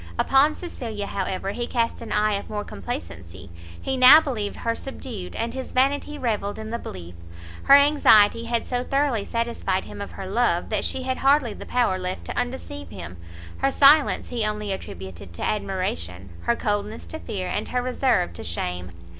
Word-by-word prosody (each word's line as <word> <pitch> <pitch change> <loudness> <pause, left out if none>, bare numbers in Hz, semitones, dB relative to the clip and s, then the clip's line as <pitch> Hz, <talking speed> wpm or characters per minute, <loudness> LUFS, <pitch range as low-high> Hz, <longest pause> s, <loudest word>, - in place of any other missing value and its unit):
Upon 285 +3 +4
Cecilia, 225 - -5
however, 195 0 -3
he 240 +3 -3
cast 230 -1 -1
an 225 -2 -7
eye 210 0 +2
of 200 - -4
more 210 -1 -3
complacency; 85 - -7 0.3
he 265 - -2
now 260 +4 +10
believed 230 -10 -3
her 230 - -1
subdued, 230 -7 -7
and 230 +1 -2
his 260 0 -6
vanity 280 +3 +1
revelled 215 -6 -2
in 220 0 -6
the 235 - -2
belief: 90 - -8 0.5
her 275 - +9
anxiety 235 -7 +5
had 235 0 -1
so 245 -1 -2
thoroughly 275 -6 0
satisfied 230 -5 -1
him - - -9
of 200 - -7
her 195 - -7
love, 195 -3 +1
that 215 -2 0
she 260 - -2
had 260 0 -1
hardly 270 -4 +3
the - - -10
power 240 -7 +1
left 185 0 -4
to - - -5
undeceive 245 - -4
him; 85 +2 -8 0.4
her 275 - +2
silence 285 +2 +5
he 240 -3 -2
only 210 -1 -2
attributed 95 - -7
to - - -5
admiration, 95 - -3
her 235 - +3
coldness 210 0 -2
to 320 - -7
fear, 195 -9 -4
and 210 - -2
her 250 0 -1
reserve 250 - +1
to 85 - -8
shame. 90 +1 -4
215 Hz, 180 wpm, -24 LUFS, 185-255 Hz, 0.5 s, now